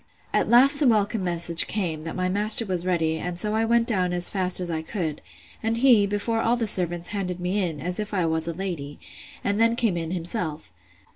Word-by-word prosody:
At -, -, +1 dB
last 275 Hz, +4 st, +5 dB
the 290 Hz, -, +3 dB
welcome 210 Hz, -2 st, +1 dB
message 170 Hz, -1 st, +3 dB
came, 175 Hz, -7 st, -3 dB
that -, -, -7 dB
my 185 Hz, 0 st, -1 dB
master 210 Hz, +4 st, +3 dB
was 180 Hz, -2 st, -3 dB
ready; 160 Hz, -3 st, 0 dB
and 180 Hz, -1 st, -5 dB
so 210 Hz, +4 st, -1 dB
I 220 Hz, +1 st, +1 dB
went 235 Hz, 0 st, +2 dB
down 185 Hz, -6 st, 0 dB
as 175 Hz, 0 st, +1 dB
fast 185 Hz, -2 st, -1 dB
as 180 Hz, -, -3 dB
I 160 Hz, -2 st, -3 dB
could; 160 Hz, -3 st, -4 dB, 0.4 s
and 225 Hz, +1 st, -1 dB
he, 235 Hz, -5 st, +5 dB
before 215 Hz, +3 st, -1 dB
all 235 Hz, +2 st, +1 dB
the 235 Hz, -, -1 dB
servants, 175 Hz, -3 st, +2 dB
handed 185 Hz, -3 st, -4 dB
me 180 Hz, +3 st, -1 dB
in, 165 Hz, -5 st, -3 dB
as 180 Hz, +5 st, -4 dB
if 210 Hz, -1 st, -4 dB
I 185 Hz, -4 st, 0 dB
was 160 Hz, 0 st, -1 dB
a 170 Hz, -, -2 dB
lady; 165 Hz, -6 st, -5 dB, 0.5 s
and 205 Hz, +2 st, 0 dB
then 230 Hz, 0 st, +3 dB
came 225 Hz, -7 st, 0 dB
in 165 Hz, -1 st, -4 dB
himself. 170 Hz, -2 st, -4 dB
185 Hz, 220 wpm, -24 LUFS, 170-220 Hz, 0.5 s, last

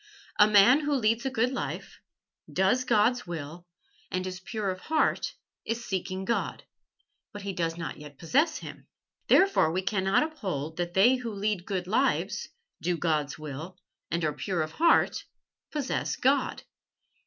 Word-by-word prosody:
A 210 Hz, -, +8 dB
man 215 Hz, +6 st, +7 dB
who 295 Hz, -1 st, 0 dB
leads 230 Hz, +1 st, +1 dB
a -, -, +1 dB
good 250 Hz, 0 st, +1 dB
life, 265 Hz, -, -5 dB, 0.5 s
does 195 Hz, +8 st, +2 dB
God's 235 Hz, 0 st, +2 dB
will, 170 Hz, +1 st, -7 dB, 0.4 s
and 185 Hz, 0 st, -2 dB
is 185 Hz, 0 st, -5 dB
pure 200 Hz, +1 st, -3 dB
of 185 Hz, -, -6 dB
heart, 310 Hz, +9 st, 0 dB, 0.3 s
is 230 Hz, +1 st, -3 dB
seeking 190 Hz, 0 st, -3 dB
God. 235 Hz, -, -1 dB, 0.7 s
But 205 Hz, -1 st, -8 dB
he 200 Hz, -1 st, -3 dB
does 165 Hz, -2 st, -2 dB
not 165 Hz, -3 st, -5 dB
yet 145 Hz, -2 st, -11 dB
possess 285 Hz, -, +2 dB
Him. -, -, -10 dB, 0.4 s
Therefore 380 Hz, -, +5 dB
we 185 Hz, +3 st, -1 dB
cannot 190 Hz, +4 st, +2 dB
uphold 185 Hz, -, -4 dB
that 175 Hz, 0 st, -3 dB
they 240 Hz, +7 st, +6 dB
who 245 Hz, -2 st, -5 dB
lead 205 Hz, -3 st, -2 dB
good 185 Hz, -3 st, -2 dB
lives, 245 Hz, +9 st, 0 dB, 0.3 s
do 175 Hz, -1 st, 0 dB
God's 155 Hz, -4 st, 0 dB
will, 155 Hz, +4 st, -7 dB, 0.3 s
and 170 Hz, -1 st, -1 dB
are 150 Hz, -, 0 dB
pure 180 Hz, -2 st, -1 dB
of 155 Hz, -, -6 dB
heart, 335 Hz, -, +3 dB, 0.5 s
possess 290 Hz, -4 st, -2 dB
God." 275 Hz, +2 st, +1 dB
195 Hz, 155 wpm, -28 LUFS, 175-245 Hz, 0.7 s, A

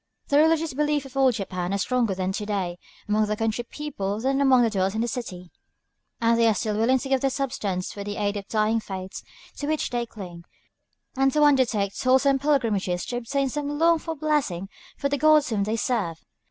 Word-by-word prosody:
The 285 Hz, -, +4 dB
religious 320 Hz, -1 st, +3 dB
beliefs 295 Hz, 0 st, 0 dB
of 270 Hz, 0 st, -12 dB
old 265 Hz, -3 st, +3 dB
Japan 185 Hz, -2 st, -3 dB
are -, -, 0 dB
stronger 230 Hz, 0 st, 0 dB
to 190 Hz, +3 st, -2 dB
day 185 Hz, -4 st, -2 dB, 0.3 s
among 210 Hz, 0 st, +2 dB
the 210 Hz, -, -1 dB
country 225 Hz, +2 st, -1 dB
people 225 Hz, -8 st, -4 dB
than 270 Hz, +3 st, 0 dB
among 260 Hz, -3 st, +5 dB
the 230 Hz, -, +1 dB
dwellers 190 Hz, 0 st, 0 dB
in 225 Hz, +2 st, 0 dB
cities. 185 Hz, -8 st, -6 dB, 0.7 s
And 230 Hz, 0 st, +2 dB
they 230 Hz, -, +5 dB
are 220 Hz, -, +3 dB
still 210 Hz, +1 st, -1 dB
willing 230 Hz, +5 st, +3 dB
to 265 Hz, -, -5 dB
give 270 Hz, 0 st, +3 dB
of -, -, -11 dB
their 275 Hz, -, +2 dB
substance 220 Hz, -9 st, -3 dB
for 200 Hz, -, -6 dB
the 205 Hz, 0 st, -5 dB
aid 205 Hz, 0 st, -1 dB
of 200 Hz, -1 st, -5 dB
the -, -, -19 dB
dying 220 Hz, +1 st, +2 dB
faiths 190 Hz, -3 st, -7 dB, 0.4 s
to 290 Hz, -, -4 dB
which 310 Hz, 0 st, -1 dB
they 240 Hz, -1 st, -2 dB
cling, 175 Hz, -6 st, -10 dB, 0.7 s
and 270 Hz, +1 st, +3 dB
to 300 Hz, -, +3 dB
undertake 240 Hz, -9 st, +3 dB
toilsome 265 Hz, +2 st, +3 dB
pilgrimages 225 Hz, -11 st, 0 dB
to 245 Hz, -, -3 dB
obtain 270 Hz, +3 st, -1 dB
some 290 Hz, +1 st, -3 dB
longed 330 Hz, 0 st, +3 dB
for 325 Hz, -1 st, -4 dB
blessing 280 Hz, -, -1 dB, 0.3 s
from 280 Hz, -1 st, -2 dB
the 285 Hz, -, 0 dB
gods 305 Hz, -1 st, +5 dB
whom 200 Hz, -2 st, 0 dB
they 215 Hz, +2 st, -1 dB
serve. 210 Hz, -8 st, -1 dB
235 Hz, 210 wpm, -25 LUFS, 200-275 Hz, 0.7 s, among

